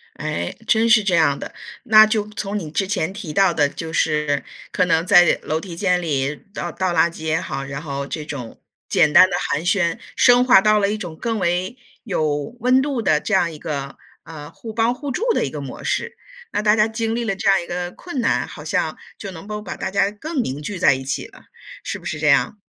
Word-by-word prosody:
哎， 85 +1 -4
真 225 +1 +3
是 230 -2 +6
这 190 -3 +1
样 155 -4 +3
的， - - -8 0.3
那 215 -2 +8
就 215 -1 0
从 210 0 -4
你 160 -5 -6
之 190 +4 -1
前 190 -3 -1
提 195 -7 -7
到 195 -2 +3
的 145 -3 +3
就 160 +2 -7
是 150 -3 0 0.3
可 180 - +2
能 165 0 +1
在 175 -3 +6
楼 155 +1 -2
梯 170 -1 -8
间 180 -1 +1
里 140 -3 -1 0.2
倒 175 -4 -4
倒 185 0 -1
垃 170 0 +3
圾 160 - -11
也 160 +1 0
好， 135 -1 -5
然 140 +1 -6
后 140 -2 -5
这 155 0 -5
种 130 -7 -8 0.3
简 150 -1 +3
单 185 - +8
的 175 - 0
寒 150 +4 -1
暄， 175 -2 +1 0.2
升 245 0 +5
华 250 -6 +7
到 215 +1 +3
了 200 -1 +1
一 215 - -2
种 175 -6 -7
更 225 +5 -2
为 180 +5 -1 0.3
有 155 - -2
温 255 +2 +4
度 275 -4 -2
的 155 -9 +2
这 - - -5
样 170 - +3
一 155 - -10
个， 140 -3 -5 0.3
呃， 150 -2 -10
互 220 +5 -10
帮 230 +2 +2
互 285 +2 -6
助 265 - -3
的 - - 0
一 - - -3
个 - - -6
模 - - -8
式。 475 0 -2 0.4
那 - - 0
大 210 0 +4
家 215 0 +3
经 225 0 -2
历 235 - -1
了 195 -3 -1
这 - - -1
样 195 -2 +4
一 - - -9
个 175 0 -4
困 320 -8 -6
难， 230 - +1
好 - - -10
像 - - -1 0.2
就 200 - -7
能 180 +1 -10
够 210 0 -5
把 - - -6
大 - - -4
家 200 +1 +2
更 280 +7 -3
凝 140 - -4
聚 185 +5 -5
在 185 - +5
一 135 0 -3
起 135 - -3
了， - - -18 0.4
是 - - -4
不 - - -17
是 150 - -4
这 150 - -1
样？ 150 +8 +3
180 Hz, 255 characters per minute, -21 LUFS, 155-215 Hz, 0.4 s, 那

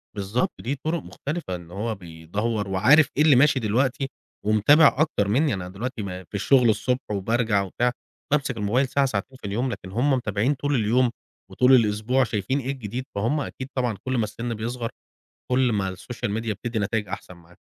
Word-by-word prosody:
بالضبط، 100 +4 -1
دي 135 +5 -2
طرق 160 +3 -3
مختلفة 145 - -5
إن 85 -1 -11
هو 110 +4 -3
بيدوّر، 100 +5 -3
وعارف 115 +11 +5
إيه 150 - +5
اللي 155 -3 +6
ماشي 135 +1 +5
دلوقتي، 130 +6 0 0.4
ومتابع 135 +9 +5
أكتر 150 -10 +1
منِّي، 135 +8 +2
أنا 90 -2 -4
دلوقتي 115 +6 -5
ما 95 -1 -6
في 90 - -30
الشغل 120 +4 +4
الصبح 125 +2 -1
وبارجع 110 +1 +1
وبتاع، 120 +6 0 0.4
بامسك 140 -4 +1
الموبيل 115 +6 +1
ساعة 140 +2 +2
ساعتين 130 +2 -3
في - - -5
اليوم، 120 +6 -1
لكن 95 - -7
هم 125 +7 +2
متابعين 120 +1 +1
طول 145 +1 -1
اليوم، 120 +2 +2 0.4
وطول 125 +1 +4
الأسبوع، 115 +3 +2
شايفين 120 +4 -1
إيه 135 0 -3
الجديد، 125 -1 -5
فهم 115 +9 0
أكيد 130 -1 -6
طبعًا 120 -5 0
كل 130 0 0
ما 115 - +2
السن 115 +3 -4
بيصغر، 115 +2 -3 0.6
كل 125 -1 +3
ما 95 -3 -1
الSocial 115 +5 -5
Media 115 -1 -2
بتدِّي 115 +3 -4
نتايج 105 0 -1
أحسن 90 -1 -7
معاك. 85 0 -20
115 Hz, 185 wpm, -24 LUFS, 100-130 Hz, 0.6 s, اللي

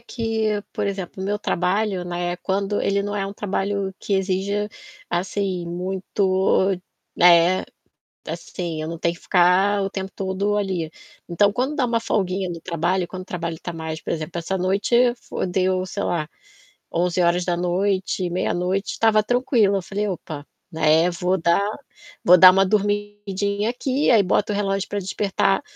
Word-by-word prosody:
que, 225 -3 -2
por - - -2
exemplo, 195 -1 -4
meu 205 +2 -1
trabalho, 190 +1 0
né, 175 0 -3
quando 200 +2 -1
ele 200 0 +1
não 205 +1 -3
é 195 -1 -1
um 195 - -6
trabalho 200 -1 -2
que 200 - -2
exija, 195 +2 0 0.4
assim, 185 0 -2
muito, 190 +2 +1 0.4
né, 175 +1 +5 0.7
assim, 170 -4 -5
eu 155 - -4
não 165 0 -5
tenho 170 +1 0
que 170 - -17
ficar 190 +3 +3
o 195 - -1
tempo 190 -1 -5
todo 195 +2 -1
ali. 185 -6 -2 0.4
Então 200 +4 +3
quando 260 +6 -1
dá 260 -5 +2
uma 230 -1 0
folguinha 190 -4 -1
no 170 - -6
trabalho, 175 +2 -1
quando 185 0 -7
o - - -11
trabalho 170 -3 -4
tá 175 - -4
mais, 160 -1 -5
por - - -3
exemplo, 165 +1 -4
essa 190 +3 -2
noite 215 +7 +2
fo - - -4
deu, 185 0 0
sei 200 +2 -4
lá, 155 -3 -1 0.6
23h, 180 +2 0
meia-noite, 185 +2 -1
tava 215 -1 +4
tranquilo. 235 -4 +2
Eu - - -2
falei: 205 +3 -3
"Opa, 155 -5 -6 0.3
né, 160 +1 +3
vou 180 +2 0
dar 170 +2 +2 0.6
vou 180 +1 +7
dar 185 +1 +11
uma 195 +1 +3
dormidinha 205 0 -1
aqui", 260 +3 0
aí 220 -4 +6
boto 200 +3 +1
o - - -1
relógio 195 -1 -1
pra 205 - -3
despertar, 195 0 0
190 Hz, 160 wpm, -22 LUFS, 175-205 Hz, 0.7 s, dar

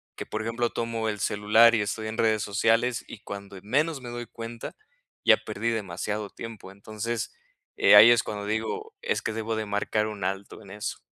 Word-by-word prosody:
que, - - -6
por 110 - -4
ejemplo, 115 +2 -1
tomo 115 -1 -2
el 105 - -4
celular 110 +4 +5
y 110 - +2
estoy 110 +2 -3
en 110 - -5
redes 110 -1 +2
sociales, 115 +4 +1
y - - -9
cuando 100 -2 -8
menos 140 - 0
me 120 - -7
doy 120 0 -5
cuenta, 115 0 -8 0.5
ya - - +7
perdí 115 - -3
demasiado 105 -1 -3
tiempo, 110 -5 -9
entonces, 110 +3 -4 0.4
eh, - - +7
ahí 110 +3 +10
es 120 - +4
cuando 105 -1 -5
digo: 110 - -3
"Es 475 -1 -1
que - - -3
debo 110 0 -2
de 110 - -2
marcar 105 +1 0
un 105 -3 -6
alto 95 +3 -4
en 100 -3 -13
eso". 105 +1 -5
110 Hz, 195 wpm, -27 LUFS, 105-115 Hz, 0.5 s, ahí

